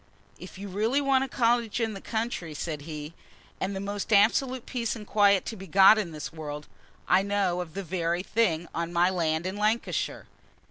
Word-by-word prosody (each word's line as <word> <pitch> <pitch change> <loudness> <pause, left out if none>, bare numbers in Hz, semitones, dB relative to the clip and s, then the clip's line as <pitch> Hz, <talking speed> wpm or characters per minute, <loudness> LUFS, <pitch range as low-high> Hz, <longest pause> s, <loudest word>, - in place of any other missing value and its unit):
"If 180 - -11
you 200 +1 -7
really 215 +8 0
want 275 -2 +2
a - - -7
cottage 235 -2 +1
in 225 -2 -1
the 195 - -8
country," 220 -8 -3
said 150 -1 -4
he, 150 0 -7 0.5
"and 195 +1 -2
the - - -3
most 200 +2 -4
absolute 235 +5 +3
peace 235 -3 -2
and 215 -2 -9
quiet 200 -2 +3
to 225 - -5
be 195 -1 -10
got 195 +3 +7
in 195 -5 -2
this 155 +1 -7
world, 150 -2 -6 0.4
I 185 +1 +5
know 195 -3 0
of 170 -1 -9
the 195 - -3
very 175 0 -1
thing 175 -7 0
on 170 0 -3
my 175 +1 +3
land 165 -2 0
in 190 +2 -3
Lancashire. 215 +3 -1
195 Hz, 195 wpm, -27 LUFS, 170-220 Hz, 0.5 s, got